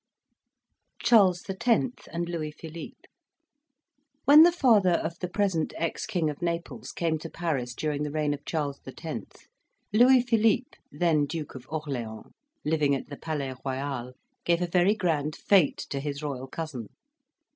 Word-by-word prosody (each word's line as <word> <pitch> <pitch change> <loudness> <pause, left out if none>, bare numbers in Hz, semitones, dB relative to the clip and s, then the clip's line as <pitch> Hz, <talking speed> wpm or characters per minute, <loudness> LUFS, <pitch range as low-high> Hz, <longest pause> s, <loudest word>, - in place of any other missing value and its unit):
CHARLES 200 -7 +5
X. 230 +5 0
AND 170 +1 -2
LOUIS 155 -3 -4
PHILIPPE 160 0 -9 1.2
When 295 +2 +9
the 345 +2 +8
father 225 - +4
of 170 0 -2
the 180 - -3
present 190 -5 0
ex 165 +4 -2
King 180 -7 0
of 150 +2 -4
Naples 170 0 -3
came 165 -2 -1
to 165 - -7
Paris 140 -9 -2
during 150 0 -2
the 150 - -1
reign 150 0 0
of 145 - -7
Charles 145 -3 -3
X., - - -8 0.5
Louis 245 +3 +6
Philippe, 225 0 +1
then 155 -1 +2
Duke 155 -1 -5
of 130 -1 -10
Orleans, 130 -8 -5 0.3
living 150 -2 +2
at 135 - -6
the 145 - -7
Palais 145 -5 -3
Royal, 130 -2 -3 0.3
gave 170 +1 +2
a - - -1
very 180 +4 +3
grand 155 -6 0
fete 190 -8 +3
to 140 - -1
his 145 +1 -4
royal 135 -3 -4
cousin. 135 -6 -6
160 Hz, 150 wpm, -27 LUFS, 145-185 Hz, 1.2 s, When